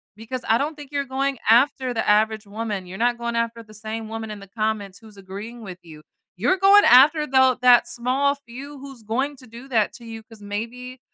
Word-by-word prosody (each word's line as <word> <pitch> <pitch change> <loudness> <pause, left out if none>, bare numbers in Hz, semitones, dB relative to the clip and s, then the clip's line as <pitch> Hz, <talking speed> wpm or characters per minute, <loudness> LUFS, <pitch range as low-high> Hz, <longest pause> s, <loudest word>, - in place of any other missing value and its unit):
Because 230 +4 -6
I 225 - +5
don't 290 +4 -2
think 290 -2 -12
you're 285 -1 -2
going 270 +1 -2
after 255 +2 +3
the 225 - -2
average 215 0 +2
woman. 205 -2 -5
You're 185 +2 -8
not 240 +2 +1
going 235 0 -3
after 230 0 -2
the 215 -1 -17
same 220 +1 -6
woman 225 -1 -6
in 210 - -8
the 200 - -13
comments 210 -2 -3
who's 220 -2 -16
agreeing 200 +5 -9
with 185 -3 -8
you. 155 -3 -13 0.4
You're 305 - +2
going 395 +2 +6
after 295 +5 +6
tho 260 -2 +4
that 250 -1 +6
small 265 +4 0
few 275 +4 -10
who's 270 -3 -11
going 260 +7 -2
to 255 - -15
do 235 +3 -12
that 220 -5 +1
to 240 - -13
you 225 -1 -9
'cause 220 -1 -17
maybe 235 +5 -6
235 Hz, 215 wpm, -22 LUFS, 215-260 Hz, 0.4 s, going